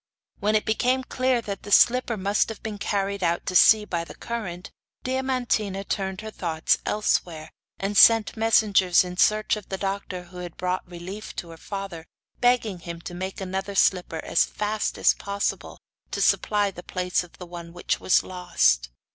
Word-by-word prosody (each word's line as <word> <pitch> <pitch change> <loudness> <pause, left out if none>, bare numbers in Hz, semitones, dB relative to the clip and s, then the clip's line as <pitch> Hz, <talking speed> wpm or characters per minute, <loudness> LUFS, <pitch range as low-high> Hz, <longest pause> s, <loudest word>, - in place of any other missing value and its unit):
When 210 +1 +1
it 215 - +1
became 250 +4 +1
clear 255 -1 0
that 200 -2 -5
the 205 - -9
slipper 240 +2 +4
must 200 +3 +1
have 225 - -8
been 215 -2 -5
carried 200 -1 -1
out 170 0 0
to 185 - -3
sea 215 +3 +7
by 170 -4 -2
the - - -11
current, 190 -7 -6 0.3
Diamantina 250 -7 -1
turned 190 -1 -3
her 220 0 -7
thoughts 160 -5 0
elsewhere, 170 -6 -1 0.3
and 200 +1 -3
sent 225 0 +6
messengers 210 -5 +4
in 180 0 -7
search 215 +3 +3
of 210 -2 -10
the 190 - -3
doctor 195 -2 -4
who 180 +1 -14
had 175 -2 -8
brought 180 0 -2
relief 185 +4 -8
to 170 - -6
her 165 - -11
father, 195 -3 -7 0.3
begging 245 -6 +2
him 170 0 -7
to 175 - -8
make 190 +2 -5
another 190 +1 -4
slipper 180 -4 +1
as - - +3
fast 210 0 -2
as - - +4
possible, 200 0 -3 0.3
to - - -4
supply 205 -2 +2
the 175 - -10
place 180 0 -1
of 175 - -16
the 180 - -8
one 170 -1 -9
which 175 - -2
was - - +3
lost. 175 - +1
195 Hz, 180 wpm, -25 LUFS, 180-215 Hz, 0.3 s, sea